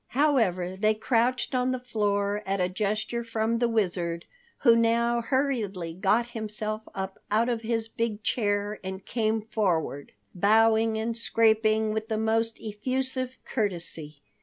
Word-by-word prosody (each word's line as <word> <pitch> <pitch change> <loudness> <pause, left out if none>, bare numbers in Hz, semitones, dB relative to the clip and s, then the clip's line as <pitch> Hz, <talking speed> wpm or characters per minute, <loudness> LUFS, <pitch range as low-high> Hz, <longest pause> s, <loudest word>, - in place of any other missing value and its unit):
However, 195 - +2
they 215 +2 +2
crouched 240 +3 +1
on 250 0 +1
the 255 - -2
floor 205 -4 0
at 195 0 0
a 180 - +2
gesture 215 +5 -2
from 230 0 -1
the 240 -1 +2
Wizard, 175 -6 -1 0.4
who 235 -4 +6
now 235 +1 +2
hurriedly 230 - -1
got 210 +6 +1
himself 215 -1 -3
up 190 0 -4
out 225 +3 +2
of 235 -2 -1
his 225 0 -1
big 225 -2 -3
chair, 205 -2 0
and 190 0 -6
came 220 -2 0
forward, 175 -10 -1 0.2
bowing 220 +3 +4
and 225 +1 -2
scraping 220 -1 +2
with 220 0 -3
the 220 -1 -1
most 225 +1 +1
effusive 255 +4 -3
courtesy. 170 - -3
220 Hz, 140 wpm, -27 LUFS, 200-230 Hz, 0.4 s, who